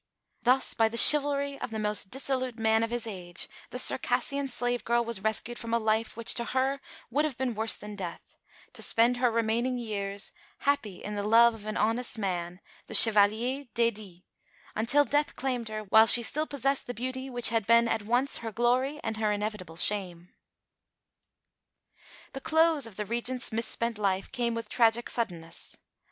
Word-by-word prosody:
Thus 255 +2 +1
by 225 -1 +2
the 235 - -6
chivalry 280 0 +7
of - - -4
the 220 - -6
most 210 -2 -1
dissolute 260 -1 0
man 220 0 +2
of 230 - -1
his 240 -1 -3
age 180 -5 -5 0.2
the - - -7
Circassian 280 0 +2
slave 245 -1 -3
girl 235 0 0
was 230 -4 -3
rescued 220 +3 -2
from 230 0 -3
a - - +3
life 220 0 -1
which 230 - +2
to 235 - -4
her 265 +2 -1 0.3
would 290 +5 +1
have 300 -5 -3
been 260 -2 -2
worse 220 +1 -1
than 210 0 -10
death 180 -4 -9 0.4
to - - -8
spend 235 +2 +2
her 245 0 +2
remaining 230 +2 -1
years, 200 -3 -4 0.3
happy 280 -10 -2
in 210 - -6
the 205 - -3
love 230 +3 +4
of 215 -1 -11
an 215 - -4
honest 230 +3 -1
man, 180 -3 -4 0.3
the 220 - 0
Chevalier 225 +6 +5
d'Aydie, 210 -6 -2 0.5
until 275 +7 +2
death 290 +1 -1
claimed 250 -4 -3
her 215 0 -5
while 220 +2 +5
she 235 +2 +7
still 305 +7 0
possessed 275 -1 -2
the 245 - -6
beauty 260 +3 -5
which 245 -2 +2
had 225 -3 -1
been 235 0 +4
at 225 -1 -1
once 245 +6 0
her 225 -1 -6
glory 250 +6 0
and 225 -1 -4
her 215 -1 0
inevitable 205 -5 -5
shame. 180 -2 -2 2.0
The 270 - -7
close 320 -4 +2
of 220 - -14
the 210 - -5
Regent's 240 +3 -2
mis 225 +1 -2
spent 230 -2 -3
life 195 -2 -2
came 240 -3 -2
with 230 -1 -5
tragic 230 +1 +1
suddenness. 170 -8 -5
230 Hz, 180 wpm, -28 LUFS, 210-250 Hz, 2.0 s, chivalry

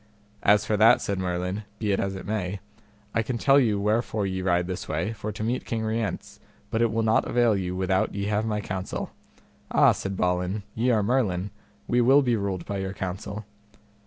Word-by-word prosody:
As 105 +1 +4
for 105 - +1
that, 110 +2 +6
said 100 -1 -2
Merlin, 90 +2 -2 0.2
be 105 -2 -1
it 100 - +1
as 95 0 -1
it 95 - -7
be 105 - -4
may, 100 -2 -2 0.5
I 115 - +2
can 115 +2 -3
tell 135 +4 +5
you 110 -6 +2
wherefore 105 0 0
ye 95 -1 -2
ride 90 -1 +1
this 95 0 -5
way, 110 - -2
for 105 0 -5
to 105 +1 -5
meet 120 +3 -1
King 115 -1 -3
Rience; 110 -3 -3 0.3
but 110 - 0
it 115 -2 +3
will 115 0 0
not 110 0 +3
avail 120 -3 +3
you 90 -2 -2
without 95 +1 0
ye 100 0 -2
have 105 +1 0
my 105 -1 -1
counsel. 95 -2 -4 0.6
Ah! - - +5
said 100 -1 -4
Balin, 90 +3 0
ye 120 +3 0
are 110 -4 +3
Merlin; 100 -5 0 0.4
we 120 - +3
will 135 +4 +6
be 120 -2 +2
ruled 100 -4 -3
by 100 -1 -3
your 95 0 -3
counsel. 100 +2 -5
105 Hz, 210 wpm, -26 LUFS, 95-110 Hz, 0.6 s, that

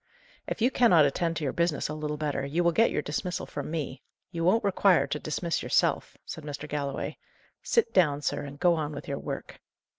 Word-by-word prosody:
"If 225 - -2
you 250 - +4
cannot 180 - +5
attend 165 +4 0
to 155 - -3
your 135 - -1
business 170 -3 0
a 150 - -4
little 150 0 -3
better, 145 -2 -2
you 155 +6 0
will 170 - +4
get 225 +7 +4
your 150 - -1
dismissal 180 +5 -3
from 145 0 -6
me; 150 -4 -4 0.3
you 165 -2 -3
won't 195 +7 +3
require 195 -2 +4
to 150 - -3
dismiss 165 +3 -2
yourself," - - +1
said 160 - -7
Mr. 145 0 -6
Galloway. 140 -2 -3 0.4
"Sit 465 - +1
down, 150 -6 +3
sir, - - -1
and 140 0 -8
go 175 -1 +4
on 155 -2 -2
with 145 - -8
your 140 -1 -3
work." - - -6
155 Hz, 210 wpm, -28 LUFS, 145-175 Hz, 0.4 s, cannot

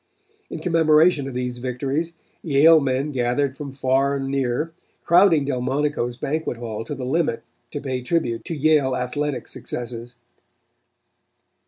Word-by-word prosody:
In - - -5
commemoration 160 -3 +3
of 135 - -7
these 125 -1 -3
victories, 135 +6 -2 0.3
Yale 160 +2 +6
men 135 +1 -1
gathered 130 +1 0
from 140 -1 -7
far 135 +1 +1
and 135 -1 -3
near, 135 +4 -1 0.3
crowding 170 -4 +5
Delmonico's 130 -1 -1
banquet 150 -3 -2
hall 115 -2 -5
to 145 - -5
the 130 -1 -5
limit 135 -4 0 0.3
to 145 - -5
pay 130 -3 -3
tribute 125 -4 -1
to 165 - -4
Yale 145 -3 +3
athletic 130 +1 -3
successes. 120 0 -7
135 Hz, 135 wpm, -22 LUFS, 125-150 Hz, 0.3 s, Yale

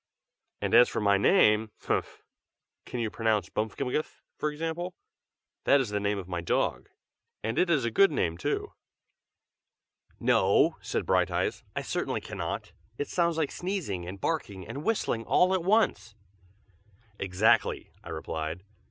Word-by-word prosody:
And - - -1
as 120 +1 +8
for - - -2
my 100 -2 +3
name 110 - +4
humph! - - -2 0.6
can 125 - -4
you 110 -2 -1
pronounce 110 -5 0
Bmfkmgth, 125 +7 -2
for 150 - -1
example? 165 +4 -4 0.7
that 140 - +6
is 130 -5 -1
the 105 0 -1
name 100 0 0
of 95 -3 -6
my 90 -2 -3
dog, 85 - -1 0.5
and 115 +1 -1
it 180 - +3
is 145 -8 +2
a 115 - 0
good 195 - +5
name, 85 - 0
too." - - -2 1.5
"No!" - - +3
said - - -2
Brighteyes. - - +1
"I - - -2
certainly - - -2
cannot. - - -5 0.2
It 145 - -3
sounds 170 -2 +1
like 155 -3 0
sneezing 170 - -3
and 95 +2 -7
barking 100 - -3
and 140 - -6
whistling 180 - 0
all 180 +10 +3
at 185 -3 0
once." 185 - +2 1.0
"Exactly!" 95 +3 +2
I - - -10
replied. 80 +3 -4
115 Hz, 145 wpm, -28 LUFS, 100-160 Hz, 1.5 s, as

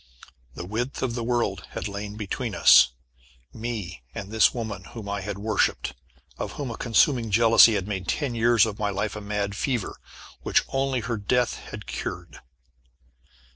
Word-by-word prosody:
The 85 - -6
width 120 +9 -3
of 125 -3 -1
the 120 -1 -3
world 120 0 -1
had - - -3
lain 105 +1 -6
between 110 +1 -4
us, - - +8 0.7
me 110 - -5
and 100 - -6
this 110 0 +5
woman 110 -6 -5
whom 110 -4 -9
I 100 0 -3
had 100 +1 -5
worshipped, 105 0 0 0.5
of - - -4
whom 140 -5 -4
a - - -5
consuming 120 0 +2
jealousy 115 +1 +6
had 95 -1 -2
made 95 -4 -4
ten 140 -5 -1
years 115 -1 +4
of 105 -2 -5
my 105 - 0
life 100 +2 -2
a 105 - -6
mad 100 -1 -2
fever, 125 -1 -2 0.5
which - - +2
only 135 -2 0
her 115 -2 -3
death 120 +4 0
had - - -8
cured. 85 -4 -6
110 Hz, 170 wpm, -25 LUFS, 100-120 Hz, 0.7 s, us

